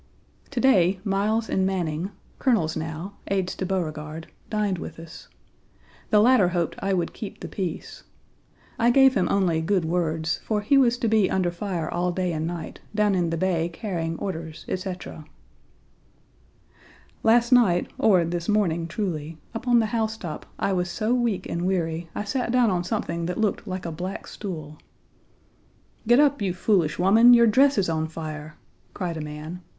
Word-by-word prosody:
To 275 - -3
day 190 -8 +4
Miles 215 +3 0
and 190 - 0
Manning, 180 -2 -1 0.3
colonels 205 - +1
now, 160 +5 -5
aides 190 -2 -1
to 185 - -4
Beauregard, 160 -4 -3 0.2
dined 210 -4 0
with 165 - -7
us. 165 0 -11 0.8
The 210 - +5
latter 230 -3 +5
hoped 175 -2 -1
I 195 - -1
would 175 -3 0
keep 210 - -8
the - - -6
peace. 180 -5 -5 0.8
I 235 0 +4
gave 265 +1 +6
him - - +1
only 175 -5 +2
good 180 0 +1
words, 160 -1 -1
for 215 -2 -1
he 210 +7 +2
was 245 -3 +4
to 235 - -1
be 215 -3 +3
under 180 -2 +1
fire 175 -3 -3
all 175 +2 -1
day 180 -1 -1
and 155 0 -2
night, 170 -1 -6 0.2
down 210 -1 +3
in 175 -3 +1
the 165 - -2
bay 170 -2 0
carrying 165 -4 -3
orders, 165 -4 -6
etc. 185 -4 -5 2.0
Last 235 +2 +4
night, 210 -9 +5
or 185 -6 +4
this 170 +2 -3
morning 170 -6 +1
truly, 165 -4 -4 0.2
up 230 +2 -6
on 240 -1 +5
the 225 - +3
housetop 220 -8 -3
I 200 - 0
was 180 -1 -1
so 220 +4 -1
weak 235 -7 0
and 175 +2 -2
weary 165 -3 -1
I - - -2
sat 235 +3 -2
down 245 -3 +3
on 175 -1 0
something 170 -1 -2
that 180 - -3
looked 215 0 -1
like 185 -1 -4
a 165 - -3
black 180 +4 -5
stool. 155 -7 -7 1.3
"Get 240 +3 +6
up, 285 -4 +3
you 185 -3 -1
foolish 180 -5 +1
woman. 225 +7 +7
Your 235 0 +6
dress 270 +5 +4
is 195 - +2
on 160 -1 -1
fire," 155 -1 -7 0.4
cried 180 -4 -3
a - - -4
man. 150 +3 -7
185 Hz, 170 wpm, -25 LUFS, 165-215 Hz, 2.0 s, woman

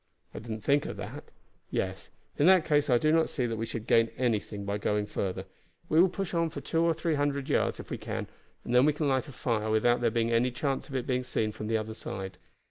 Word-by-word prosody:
"I - - -6
did 115 - -11
not 110 -1 -5
think 145 +1 +2
of - - -6
that. - - -7 0.4
Yes, - - -3 0.3
in 145 - +3
that 185 -3 +6
case 145 -2 +2
I 125 - +5
do 155 +6 +2
not 165 0 +3
see 125 - -1
that 115 -1 -2
we 115 +1 -3
should 115 -1 -5
gain 115 0 +4
anything 105 -4 -1
by 100 +1 -2
going 105 0 0
farther; 95 -2 -3 0.4
we 160 +2 +5
will 185 - +5
push 195 +1 -4
on 165 -1 +1
for 165 - -6
two 165 - -1
or 165 -1 +3
three 165 0 -1
hundred 145 -2 0
yards, - - +1
if - - -9
we - - -3
can, - - -4 0.4
and 120 - -3
then 125 +3 +6
we 150 - +4
can 150 0 -1
light 130 +1 +1
a - - -9
fire 115 -4 -1
without 120 +3 +3
there 120 - +3
being 115 +1 0
any 115 +2 +3
chance 135 +4 -2
of 135 - -6
it 125 -2 -1
being 125 -1 0
seen 110 -3 -1
from 105 0 -6
the 110 0 +2
other 110 0 -4
side." 95 -4 -6
125 Hz, 260 wpm, -29 LUFS, 110-150 Hz, 0.4 s, that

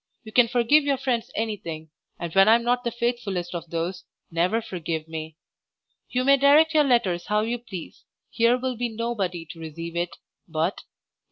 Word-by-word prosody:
You 220 - -10
can 245 +1 +5
forgive 245 +5 +4
your 280 -1 +1
friends 250 -3 -1
anything, 170 -8 -4 0.3
and 170 -1 -5
when 195 +1 +6
I 220 - +8
am 235 - 0
not 245 +1 +1
the 240 - 0
faithfullest 230 -7 -2
of 170 -1 -6
those, 170 +3 -3 0.3
never 180 +7 +1
forgive 170 -7 -4
me. 160 -1 -7 0.7
You 250 0 0
may 275 +1 +6
direct 295 +4 +5
your 305 -1 +5
letters 195 -10 +1
how 210 0 +2
you 235 +2 -2
please, 195 -8 -9 0.3
here 235 +1 +3
will 255 0 -2
be 240 +1 -2
nobody 215 -7 -3
to 165 - -13
receive 165 +1 -7
it 175 0 -2 0.3
but 160 -2 -9
Your. 165 +4 +2
_Letter - - -27
27. - - -11
215 Hz, 195 wpm, -25 LUFS, 170-245 Hz, 0.7 s, I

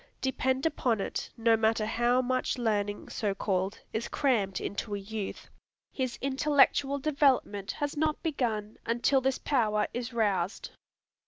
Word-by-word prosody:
Depend 265 +1 0
upon 255 -8 +1
it, - - -3
no 230 0 +4
matter 220 0 +2
how 240 +3 +2
much 255 +1 0
learning, 205 -3 -1
so 205 -3 -1
called, 195 0 -1
is 225 +2 -2
crammed 210 -10 +1
into 205 +1 -3
a - - -3
youth, 205 0 -6 0.4
his 255 -3 -2
intellectual 280 0 +3
development 270 -9 +1
has 290 0 -3
not 305 0 0
begun 225 -9 -2
until 240 +4 +2
this 265 0 +1
power 215 -6 +1
is 245 -1 -4
roused. 205 -5 -1
235 Hz, 140 wpm, -29 LUFS, 210-265 Hz, 0.4 s, no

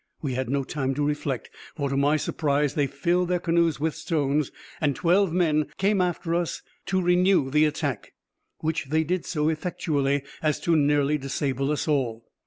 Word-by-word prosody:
We 135 -3 -1
had 130 -1 -2
no 140 +1 0
time 135 -1 -2
to 145 - 0
reflect, 145 -3 -2 0.2
for, 145 -4 -1
to 135 - -2
my 145 +2 +3
surprise, 145 -2 0
they 145 -2 +1
filled 170 +6 0
their 180 - +2
canoes 170 -2 +1
with 160 +1 0
stones, 150 -3 0 0.3
and 145 -3 +1
twelve 185 +1 +3
men 155 -4 +2
came 195 0 +2
off 180 -2 +1
after 165 - -3
us 170 -1 -1 0.2
to 190 - +1
renew 180 -5 +3
the 150 +2 +4
attack; 145 -6 -3 0.5
which 160 -1 -1
they 155 +4 +1
did 175 +2 -2
so 150 -3 0
effectually, 150 -4 0 0.2
as 155 -1 +1
to 170 - +2
nearly 145 0 +2
disable 135 0 -2
us 150 - -1
all. 120 -6 0
150 Hz, 185 wpm, -25 LUFS, 140-170 Hz, 0.5 s, the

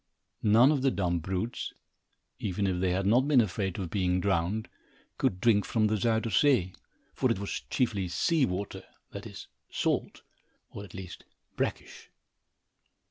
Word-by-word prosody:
None 115 +6 +6
of 145 -4 +1
the 135 - +3
dumb 90 -7 0
brutes, 95 +7 -3 0.7
even 100 0 -1
if 90 -2 0
they 95 - +2
had 95 +2 0
not 120 +7 +4
been 145 -4 +5
afraid 95 -4 0
of 90 -5 -4
being 90 -2 +1
drowned, 95 +3 0 0.5
could 90 - +1
drink 105 -1 +4
from 110 -2 +1
the 110 +1 +2
Zuyder 110 +2 0
Zee, 105 -6 +3 0.4
for - - +1
it - - +1
was 100 +1 -4
chiefly 100 -7 0
sea 155 - +2
water, 95 +2 -4 0.3
that - - -7
is, - - -10 0.2
salt, - - -1 0.5
or 100 - -7
at 100 - -12
least 95 -2 -8 0.3
brackish. - - -4
100 Hz, 155 wpm, -29 LUFS, 90-115 Hz, 0.7 s, None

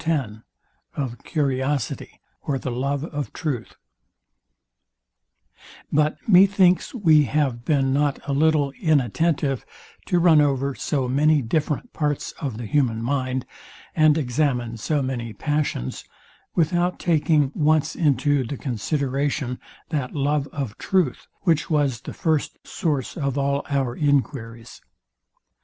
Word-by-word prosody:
SECT. - - -11
X 125 -10 -1 0.6
OF 130 -4 -4
CURIOSITY, 135 -3 -2 0.2
OR 140 - -1
THE 130 -1 -4
LOVE 140 +3 -1
OF 145 -3 -5
TRUTH 140 -9 -4 2.2
But 150 +1 +2
methinks 190 0 +5
we 160 -9 +5
have 135 -5 0
been 135 -2 +1
not 145 0 +1
a 140 - 0
little 150 -1 +2
inattentive 150 - +1 0.4
to 180 - +2
run 165 -3 +6
over 140 -1 +1
so 135 -1 -1
many 145 +3 +3
different 150 - -2
parts 150 -2 -1
of 135 -8 -3
the 120 - -5
human 115 -2 +1
mind, 130 0 -1 0.5
and 155 -1 +5
examine 125 -4 0
so 145 +6 0
many 120 -4 -4
passions, 145 - -2 0.5
without 175 +2 +1
taking 155 -4 +2
once 155 -1 +2
into 145 -2 +2
the 135 +3 -5
consideration 135 +1 -2 0.3
that 145 -5 -3
love 145 0 0
of 135 -7 -5
truth, 180 -9 0
which 160 -5 +1
was 145 -7 +1
the - - -8
first 160 -4 0
source 150 - -2
of 140 -3 -2
all 140 0 0
our 135 -4 0
enquiries. 125 -5 -1
145 Hz, 125 wpm, -23 LUFS, 130-155 Hz, 2.2 s, run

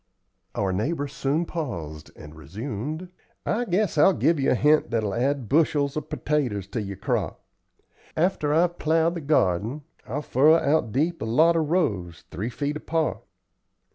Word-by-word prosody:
Our 95 -2 0
neighbor 145 - -1
soon 145 +3 -1
paused 85 - -5
and 75 0 -12
resumed: 115 - -6 0.4
"I 240 +3 0
guess 190 -4 0
I'll 190 +4 +6
give 165 -2 +2
you 135 - +2
a - - +3
hint 150 +5 +3
that'll 110 -4 -1
add 130 0 0
bushels 145 0 +2
of 155 0 -4
pertaters 125 -10 -1
to 115 - -2
yer 100 -1 -5
crop. - - -2 0.8
After 160 -3 +1
I've 175 +3 +2
plowed 160 +2 +2
the 170 - -5
garden, 125 - +1 0.2
I'll 145 +6 -3
furrow 150 +5 +5
out 150 -7 +1
deep 160 +7 0
a - - -2
lot 160 +9 +4
of 160 -3 0
rows, 100 - -1
three 105 +8 -3
feet 145 +4 -3
apart. 160 +1 -1
145 Hz, 160 wpm, -25 LUFS, 110-160 Hz, 0.8 s, I'll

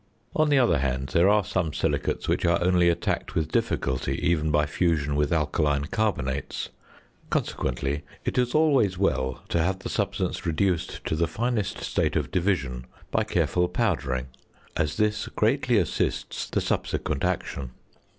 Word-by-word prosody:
On 155 -1 +3
the 145 - +4
other 120 - +4
hand, 65 0 -1
there 85 +8 +4
are 105 0 +4
some 85 -6 -1
silicates - - -1
which - - +1
are 85 -1 +4
only 90 -1 +4
attacked 85 - -1
with 80 -1 0
difficulty 65 -2 0
even 80 -2 +2
by 75 0 +3
fusion 75 -2 0
with 75 0 +1
alkaline 75 -2 +1
carbonates; 80 - -2 0.6
consequently, 70 +2 -1 0.2
it - - -1
is 125 +2 +1
always 135 - +3
well 65 -9 0
to 85 - +2
have 95 +3 +1
the 95 - -6
substance - - -1
reduced 85 +1 -1
to - - 0
the 85 +1 +1
finest 110 +1 -2
state - - 0
of - - -1
division 70 -10 -1 0.2
by - - +2
careful 90 0 +1
powdering, 90 - 0 0.5
as 75 -1 -1
this 105 0 +1
greatly 120 +1 +2
assists 90 -6 -1
the - - 0
subsequent - - -1
action. 70 -3 -2
85 Hz, 150 wpm, -26 LUFS, 75-105 Hz, 0.6 s, the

